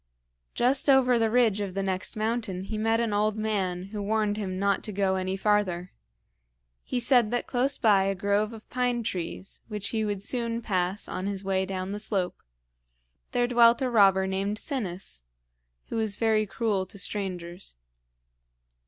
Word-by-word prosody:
Just 260 Hz, +4 st, +3 dB
over 255 Hz, -3 st, +5 dB
the 225 Hz, -1 st, +2 dB
ridge 220 Hz, -3 st, +3 dB
of 195 Hz, -2 st, -4 dB
the 195 Hz, -, -1 dB
next 190 Hz, 0 st, -2 dB
mountain 215 Hz, -4 st, -2 dB
he 215 Hz, -, -5 dB
met 225 Hz, +1 st, +1 dB
an 230 Hz, -3 st, 0 dB
old 210 Hz, +1 st, +1 dB
man 195 Hz, -5 st, -1 dB
who 210 Hz, -, -3 dB
warned 210 Hz, 0 st, 0 dB
him 190 Hz, -3 st, -3 dB
not 200 Hz, 0 st, +1 dB
to 215 Hz, -, -5 dB
go 195 Hz, -1 st, +1 dB
any 190 Hz, 0 st, -2 dB
farther. 190 Hz, -3 st, 0 dB, 0.9 s
He 250 Hz, -, -2 dB
said 245 Hz, -2 st, +4 dB
that 245 Hz, +1 st, -1 dB
close 260 Hz, +2 st, 0 dB
by 200 Hz, -4 st, +4 dB
a 195 Hz, 0 st, 0 dB
grove 205 Hz, +3 st, +1 dB
of 225 Hz, -1 st, -11 dB
pine 245 Hz, -1 st, 0 dB
trees, 185 Hz, -2 st, -5 dB
which 210 Hz, -2 st, -4 dB
he 220 Hz, -1 st, -1 dB
would 205 Hz, -2 st, -2 dB
soon 235 Hz, 0 st, -1 dB
pass 185 Hz, -2 st, -1 dB
on 185 Hz, +1 st, -4 dB
his 200 Hz, -1 st, -4 dB
way 190 Hz, -1 st, 0 dB
down 185 Hz, 0 st, -4 dB
the 205 Hz, -, -3 dB
slope, 195 Hz, -4 st, -2 dB, 0.9 s
there 245 Hz, -, +2 dB
dwelt 235 Hz, -1 st, +5 dB
a 255 Hz, -, 0 dB
robber 195 Hz, -4 st, +5 dB
named 195 Hz, +2 st, -1 dB
Sinis, 195 Hz, -, -4 dB, 0.7 s
who -, -, -3 dB
was 220 Hz, -3 st, -1 dB
very 215 Hz, -1 st, +2 dB
cruel 200 Hz, -2 st, -1 dB
to 200 Hz, -, -11 dB
strangers. 180 Hz, -, -5 dB
205 Hz, 170 wpm, -27 LUFS, 190-230 Hz, 0.9 s, over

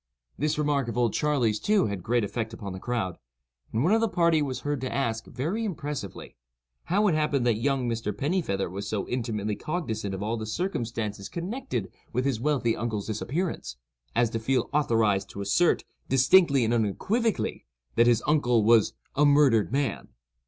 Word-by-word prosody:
This 150 Hz, +1 st, 0 dB
remark 145 Hz, -4 st, +1 dB
of 115 Hz, -, -4 dB
"Old 120 Hz, -2 st, +2 dB
Charley's," 125 Hz, -8 st, +1 dB
too, 210 Hz, -1 st, +2 dB
had 100 Hz, -3 st, -3 dB
great 120 Hz, +4 st, +1 dB
effect 110 Hz, +2 st, -3 dB
upon 100 Hz, -4 st, -6 dB
the 95 Hz, -, -6 dB
crowd; 110 Hz, -6 st, -2 dB, 0.5 s
and 115 Hz, +3 st, 0 dB
one 180 Hz, +7 st, +3 dB
of 225 Hz, -, +3 dB
the 225 Hz, -, +2 dB
party 170 Hz, -4 st, +3 dB
was 135 Hz, -3 st, -2 dB
heard 145 Hz, -2 st, -2 dB
to 130 Hz, -, -3 dB
ask, 115 Hz, -5 st, -1 dB
very 175 Hz, -, -2 dB
impressively, 150 Hz, -, -5 dB, 0.5 s
"how 205 Hz, +4 st, +2 dB
it 180 Hz, -, +3 dB
happened 150 Hz, -4 st, +1 dB
that 115 Hz, -3 st, +2 dB
young 135 Hz, -1 st, +1 dB
Mr. 115 Hz, -2 st, -2 dB
Pennifeather 135 Hz, -, -1 dB
was 95 Hz, +3 st, -6 dB
so 105 Hz, -2 st, -2 dB
intimately 110 Hz, -4 st, -2 dB
cognizant 110 Hz, -, -3 dB
of 95 Hz, -, -5 dB
all 115 Hz, +2 st, -1 dB
the 110 Hz, -1 st, -5 dB
circumstances 115 Hz, -, -3 dB
connected 170 Hz, -, -4 dB, 0.2 s
with 125 Hz, +3 st, 0 dB
his 135 Hz, -5 st, 0 dB
wealthy 130 Hz, -5 st, +1 dB
uncle's 110 Hz, -3 st, -3 dB
disappearance, 115 Hz, -, -3 dB, 0.4 s
as 120 Hz, -1 st, +2 dB
to 115 Hz, -, -2 dB
feel 130 Hz, +3 st, 0 dB
authorized 115 Hz, -9 st, +2 dB
to 100 Hz, -, -7 dB
assert, 100 Hz, -, +2 dB, 0.3 s
distinctly 135 Hz, 0 st, +5 dB
and 115 Hz, -, +1 dB
unequivocally, 200 Hz, -, 0 dB, 0.3 s
that 115 Hz, +1 st, +4 dB
his 120 Hz, -2 st, +3 dB
uncle 125 Hz, -7 st, +3 dB
was 115 Hz, 0 st, +4 dB, 0.2 s
'a 145 Hz, -, +3 dB
murdered 140 Hz, -7 st, +4 dB
man. 135 Hz, -7 st, -1 dB
120 Hz, 175 wpm, -27 LUFS, 110-150 Hz, 0.5 s, distinctly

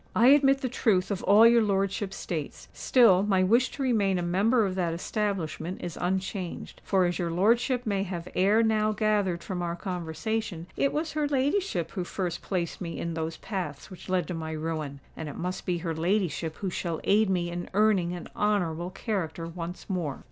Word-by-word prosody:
"I 235 Hz, +3 st, +6 dB
admit 275 Hz, -1 st, +5 dB
the 260 Hz, -, 0 dB
truth 205 Hz, -6 st, +1 dB
of 195 Hz, -, -2 dB
all 210 Hz, +3 st, +7 dB
your 235 Hz, 0 st, +6 dB
lordship 195 Hz, -1 st, 0 dB
states: 160 Hz, -6 st, -5 dB
still 225 Hz, -8 st, +5 dB
my 195 Hz, -2 st, +2 dB
wish 235 Hz, +7 st, +3 dB
to 275 Hz, -, -3 dB
remain 205 Hz, -7 st, +2 dB
a 175 Hz, -, -1 dB
member 205 Hz, +7 st, +2 dB
of 190 Hz, -, -2 dB
that 175 Hz, -3 st, -1 dB
establishment 180 Hz, -3 st, -3 dB
is 175 Hz, -2 st, -5 dB
unchanged. 185 Hz, 0 st, -3 dB
For—as 180 Hz, -3 st, +1 dB
your 170 Hz, -2 st, -1 dB
lordship 235 Hz, +8 st, +2 dB
may 200 Hz, -3 st, 0 dB
have 180 Hz, -3 st, -4 dB
ere 205 Hz, +5 st, +4 dB
now 215 Hz, -1 st, +2 dB
gathered 205 Hz, -5 st, 0 dB
from 180 Hz, -2 st, -4 dB
our 170 Hz, -1 st, -2 dB
conversation—it 180 Hz, +5 st, -3 dB
was 310 Hz, +2 st, -2 dB
her 300 Hz, -1 st, 0 dB
ladyship 275 Hz, -, 0 dB
who 185 Hz, -, -3 dB
first 175 Hz, -1 st, -3 dB
placed 175 Hz, -2 st, -3 dB
me 170 Hz, -2 st, -4 dB
in 170 Hz, 0 st, -3 dB
those 160 Hz, 0 st, -3 dB
paths 180 Hz, -9 st, -5 dB
which 185 Hz, -, -11 dB
led 180 Hz, -4 st, +1 dB
to -, -, -2 dB
my 160 Hz, -1 st, -4 dB
ruin; 155 Hz, -3 st, -4 dB
and 160 Hz, -2 st, -5 dB
it -, -, -8 dB
must 180 Hz, +1 st, -4 dB
be 180 Hz, -1 st, +1 dB
her 165 Hz, -1 st, -3 dB
ladyship 165 Hz, -2 st, -1 dB
who 190 Hz, -2 st, -4 dB
shall 170 Hz, -2 st, -3 dB
aid 210 Hz, 0 st, +3 dB
me 175 Hz, -2 st, 0 dB
in 175 Hz, 0 st, -5 dB
earning 205 Hz, -5 st, +3 dB
an 175 Hz, -, -7 dB
honourable 180 Hz, -5 st, 0 dB
character 185 Hz, -5 st, -3 dB
once 170 Hz, +1 st, -7 dB
more." 170 Hz, -8 st, -2 dB
185 Hz, 190 wpm, -28 LUFS, 170-215 Hz, -, all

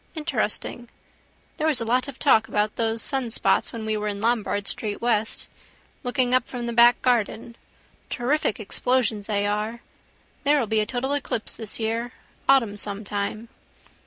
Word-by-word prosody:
Interesting. 300 Hz, -6 st, -2 dB, 0.7 s
There 315 Hz, -, 0 dB
was 300 Hz, -5 st, +3 dB
a 230 Hz, -, -2 dB
lot 250 Hz, +3 st, +1 dB
of 275 Hz, -2 st, -8 dB
talk 225 Hz, -6 st, +4 dB
about 210 Hz, 0 st, 0 dB
those 225 Hz, -1 st, +1 dB
sunspots 255 Hz, -4 st, +1 dB
when 225 Hz, -2 st, -6 dB
we 220 Hz, 0 st, 0 dB
were 210 Hz, 0 st, -2 dB
in 200 Hz, -1 st, -3 dB
Lombard 210 Hz, -3 st, 0 dB
street 210 Hz, -2 st, -3 dB
west. 225 Hz, -2 st, 0 dB, 0.5 s
Looking 250 Hz, -1 st, +1 dB
up 255 Hz, -1 st, +3 dB
from 245 Hz, -2 st, -5 dB
the 235 Hz, -, -3 dB
back 240 Hz, +1 st, +6 dB
garden. 235 Hz, -1 st, 0 dB, 0.5 s
Terrific 250 Hz, -2 st, 0 dB
explosions 220 Hz, 0 st, 0 dB
they 205 Hz, -2 st, 0 dB
are. 210 Hz, +3 st, -2 dB, 0.6 s
There 290 Hz, 0 st, +4 dB
will 245 Hz, -, +1 dB
be 220 Hz, 0 st, +1 dB
a 215 Hz, -, 0 dB
total 260 Hz, +3 st, -1 dB
eclipse 255 Hz, -5 st, -1 dB
this 220 Hz, -1 st, -6 dB
year: 230 Hz, +2 st, -2 dB, 0.4 s
autumn 230 Hz, -7 st, +4 dB
some 205 Hz, 0 st, -3 dB
time. 210 Hz, +3 st, -4 dB
230 Hz, 160 wpm, -24 LUFS, 215-250 Hz, 0.7 s, back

